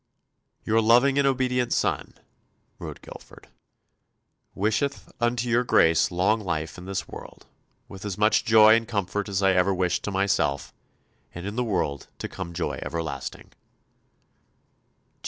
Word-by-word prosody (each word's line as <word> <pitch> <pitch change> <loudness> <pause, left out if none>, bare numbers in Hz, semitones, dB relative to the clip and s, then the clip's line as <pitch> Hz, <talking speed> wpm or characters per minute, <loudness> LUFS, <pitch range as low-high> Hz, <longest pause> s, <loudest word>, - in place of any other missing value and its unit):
"Your 110 +1 +3
loving 125 +5 +4
and 140 - +3
obedient 125 -2 0
son," - - -1 0.6
wrote - - -8
Guilford, - - -13 1.1
"wisheth 110 +8 -1
unto 120 +1 0
your 120 +1 +2
Grace 80 -8 +3
long 95 +5 +1
life 80 -5 -4
in 90 - -10
this 95 0 -4
world, - - -11 0.4
with 95 - -11
as 100 -3 -4
much 105 +1 +3
joy 110 -1 +7
and 115 -1 -1
comfort 100 -1 -2
as 100 0 -1
ever 95 0 +3
I - - -3
wished 90 -1 0
to 105 - -3
myself, 95 -8 0 0.6
and 90 +1 -7
in 100 +1 -5
the 125 - 0
world 90 -10 -2
to - - -5
come 90 -3 -7
joy 85 0 -3
everlasting. 75 -2 -5
100 Hz, 140 wpm, -25 LUFS, 90-115 Hz, 1.1 s, joy